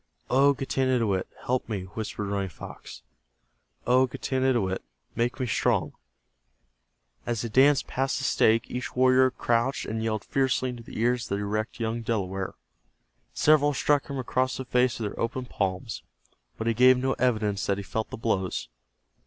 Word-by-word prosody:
"O 140 +2 +5
Getanittowit, 125 -8 0 0.2
help 125 -1 -1
me," 100 -4 -2
whispered 105 +2 -5
Running 100 -1 -2
Fox. 80 - -10 0.8
"O 130 +1 +4
Getanittowit, 125 -7 0 0.3
make 120 +3 -1
me 130 - 0
strong." 120 - +1 1.3
As 120 -2 -1
they 115 - -3
danced 135 +5 +4
past 135 +1 -1
the 130 - -4
stake 115 -3 +3
each 125 +1 -4
warrior 130 +1 +5
crouched 120 +1 0
and 110 +1 -3
yelled 110 -2 -1
fiercely 130 -1 0
into 120 -1 -8
the 115 - -9
ears 120 +1 +1
of 100 - 0
the 100 - -3
erect 105 +3 -3
young 115 0 -2
Delaware. 95 -4 -2 0.8
Several 145 -1 +4
struck 145 +1 +2
him 140 - -5
across 130 0 0
the 130 - -5
face 125 -1 +2
with 110 - -1
their - - -11
open 125 +2 -2
palms, 95 -1 -3 0.6
but 110 - -4
he 115 - +2
gave 125 +2 +6
no 130 +1 0
evidence 110 -5 +1
that 100 - +1
he 100 - -5
felt 110 +3 -3
the - - -6
blows. 95 - -1
120 Hz, 160 wpm, -27 LUFS, 105-130 Hz, 1.3 s, gave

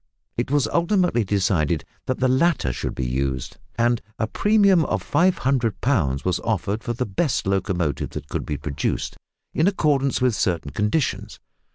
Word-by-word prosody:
It 120 - -2
was 145 -1 +2
ultimately 170 - +2
decided 90 -6 +1 0.2
that 130 - 0
the 130 - +3
latter 130 - +2
should - - -4
be 65 - -2
used, 65 0 -2 0.2
and 120 0 +2 0.2
a 110 - 0
premium 200 - +4
of - - -2
500 130 - +1
pounds 80 - +1
was 90 - +1
offered 105 0 -2
for 120 - -2
the 125 +2 -2
best 120 - -1
locomotive 95 -5 -1
that - - -7
could - - -3
be 75 - -3
produced, 75 -1 -2 0.4
in 160 - +2
accordance 145 -8 +2
with 125 -2 +2
certain 85 -7 -1
conditions. 105 +8 -1
115 Hz, 160 wpm, -23 LUFS, 85-140 Hz, 0.4 s, premium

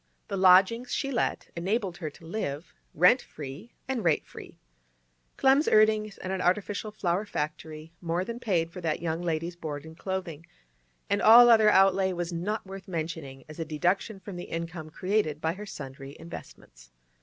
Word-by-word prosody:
The - - -2
lodgings 190 +6 +5
she 275 - -1
let 240 - -1
enabled 190 +1 -1
her 160 -4 -4
to 155 +3 -17
live 165 -4 -4 0.2
rent 180 - +5
free 150 - -10
and 260 -4 -2
rate 165 -3 +2
free. - - -12 0.8
Clem's 270 +3 +4
earnings 215 -1 +3
at 185 - -3
an 190 -1 -2
artificial 200 +3 0
flower 190 -2 -1
factory 155 -3 -5
more 175 +1 -1
than 235 +2 -6
paid 170 -8 0
for 180 - -8
that 160 -2 -1
young 165 0 -2
lady's 170 0 -2
board 150 -3 -6
and 160 0 -11
clothing, 175 -3 -5 0.6
and 200 0 0
all 240 +2 +9
other 220 -2 +6
outlay 190 -1 +4
was 175 0 -4
not 200 +7 -3
worth 190 -1 -9
mentioning 160 -6 -5
as 155 +1 -11
a - - -1
deduction 175 +7 -1
from 190 -1 -8
the 175 - -6
income 165 -1 -5
created 185 -3 -1
by 160 +1 -1
her 205 +3 -9
sundry 135 -4 -9
investments. - - -12
180 Hz, 170 wpm, -28 LUFS, 160-205 Hz, 0.8 s, all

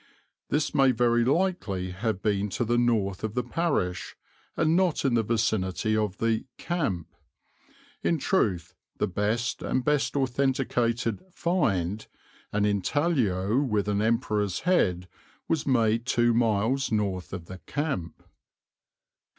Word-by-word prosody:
This 150 +1 0
may 135 -2 +5
very 120 -1 +3
likely 130 - 0
have 100 +1 -3
been 105 -1 +1
to 120 - 0
the 120 +1 +2
north 105 -6 +1
of 110 0 -3
the 125 - 0
parish 120 - -1 0.4
and 160 0 +3
not 180 -5 +1
in 135 - +2
the 115 - +3
vicinity 110 -2 0
of 105 -2 -1
the 115 -1 0
'camp.' 140 - -2 0.9
In 170 - +1
truth 95 - 0 0.2
the - - +1
best 105 +5 -1
and 130 -1 -1
best 150 -1 +1
authenticated 125 -4 0
'find,' 110 - 0 0.4
an 105 0 +1
intaglio 105 - +1
with 105 -7 0
an 105 0 +1
emperor's 105 -4 0
head, 90 - +1 0.4
was 160 -3 -1
made 115 -2 +2
two 120 -1 +3
miles 115 +4 +1
north 100 -4 -1
of 95 -3 -6
the 95 +2 -9
'camp.'" 95 - -4
115 Hz, 130 wpm, -27 LUFS, 100-135 Hz, 0.9 s, may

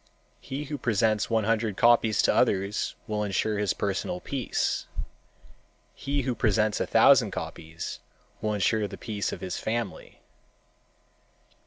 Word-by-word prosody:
He 135 +2 -5
who 145 0 -5
presents 110 -2 +1
one 110 -1 +2
hundred 110 -1 0
copies 115 -2 +4
to - - +4
others 100 -3 +1
will 105 -1 -2
insure 105 +1 0
his 105 -3 0
personal 100 - -2
peace. 140 -7 -2 1.1
He 140 0 -2
who 125 0 0
presents 110 -2 +1
a - - -1
thousand - - +6
copies 80 +1 -6 0.4
will 105 0 0
insure 105 +2 +1
the 100 0 -9
peace 105 -3 -3
of - - -7
his 90 -1 -4
family. 115 -3 -4
110 Hz, 135 wpm, -27 LUFS, 100-120 Hz, 1.1 s, thousand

